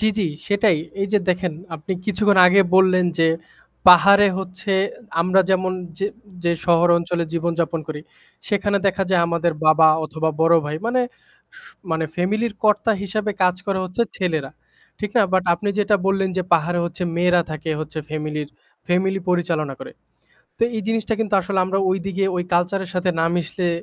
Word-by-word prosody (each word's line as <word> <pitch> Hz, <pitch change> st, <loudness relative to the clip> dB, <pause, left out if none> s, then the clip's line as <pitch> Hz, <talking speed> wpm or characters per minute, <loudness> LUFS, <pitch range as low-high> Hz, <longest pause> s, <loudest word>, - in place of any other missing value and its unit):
জি, 215 Hz, -, +3 dB
জি 200 Hz, -, +1 dB, 0.2 s
সেটাই। 205 Hz, -3 st, +3 dB, 0.2 s
এই 195 Hz, -, 0 dB
যে 210 Hz, -, +4 dB
দেখেন, 180 Hz, -1 st, 0 dB, 0.2 s
আপনি 160 Hz, +4 st, -5 dB
কিছুক্ষণ 205 Hz, 0 st, +2 dB
আগে 190 Hz, +2 st, +5 dB
বললেন 185 Hz, -1 st, +4 dB
যে, 165 Hz, -, +4 dB, 0.6 s
পাহাড়ে 200 Hz, +3 st, +7 dB
হচ্ছে 190 Hz, +2 st, -4 dB, 0.5 s
আমরা 185 Hz, +3 st, +3 dB
যেমন 185 Hz, 0 st, +1 dB, 0.3 s
যে 195 Hz, -, 0 dB, 0.4 s
যে 170 Hz, -, +2 dB
শহর 170 Hz, 0 st, +4 dB
অঞ্চলে 170 Hz, 0 st, -2 dB
জীবনযাপন 170 Hz, -1 st, -1 dB
করি, 150 Hz, -1 st, -5 dB, 0.5 s
সেখানে 205 Hz, 0 st, 0 dB
দেখা 195 Hz, 0 st, +1 dB
যায় 180 Hz, -2 st, +3 dB
আমাদের 170 Hz, 0 st, 0 dB
বাবা 155 Hz, 0 st, +6 dB, 0.2 s
অথবা 160 Hz, +1 st, -2 dB
বড়ো 165 Hz, +1 st, +5 dB
ভাই 150 Hz, +1 st, -3 dB
মানে 250 Hz, +2 st, +1 dB, 0.6 s
স -, -, -14 dB, 0.3 s
মানে 160 Hz, 0 st, 0 dB
ফ্যামিলির 210 Hz, +6 st, -1 dB
কর্তা 215 Hz, +1 st, +3 dB
হিসাবে 210 Hz, +2 st, -2 dB
কাজ 180 Hz, -1 st, +3 dB
করে 195 Hz, -1 st, -1 dB
হচ্ছে 185 Hz, +6 st, -1 dB
ছেলেরা। 160 Hz, -8 st, -2 dB, 0.5 s
ঠিক 210 Hz, -2 st, -4 dB
না, 230 Hz, -, +6 dB
বাট 185 Hz, -1 st, +2 dB
আপনি 205 Hz, +4 st, -4 dB
যেটা 205 Hz, 0 st, +3 dB
বললেন 195 Hz, 0 st, +1 dB
যে, 185 Hz, -, +1 dB
পাহাড়ে 170 Hz, +1 st, +2 dB
হচ্ছে 170 Hz, +1 st, -5 dB
মেয়েরা 175 Hz, 0 st, +3 dB
থাকে 155 Hz, +1 st, -5 dB
হচ্ছে 155 Hz, 0 st, -6 dB
ফ্যামিলির 150 Hz, -1 st, -4 dB, 0.4 s
ফ্যামিলি 190 Hz, +2 st, 0 dB
পরিচালনা 165 Hz, -5 st, -1 dB
করে। -, -, -9 dB, 0.7 s
তো -, -, -3 dB
এই 215 Hz, -, -2 dB
জিনিসটা 225 Hz, 0 st, -1 dB
কিন্তু 215 Hz, -2 st, -1 dB
আসলে 195 Hz, +1 st, -3 dB
আমরা 190 Hz, +1 st, -1 dB
ওইদিকে 195 Hz, +1 st, -1 dB
ওই 175 Hz, -, -1 dB
কালচারের 180 Hz, +2 st, 0 dB
সাথে 180 Hz, 0 st, 0 dB
না -, -, +3 dB
মিশলে 175 Hz, +1 st, -2 dB
180 Hz, 170 wpm, -21 LUFS, 170-195 Hz, 0.7 s, পাহাড়ে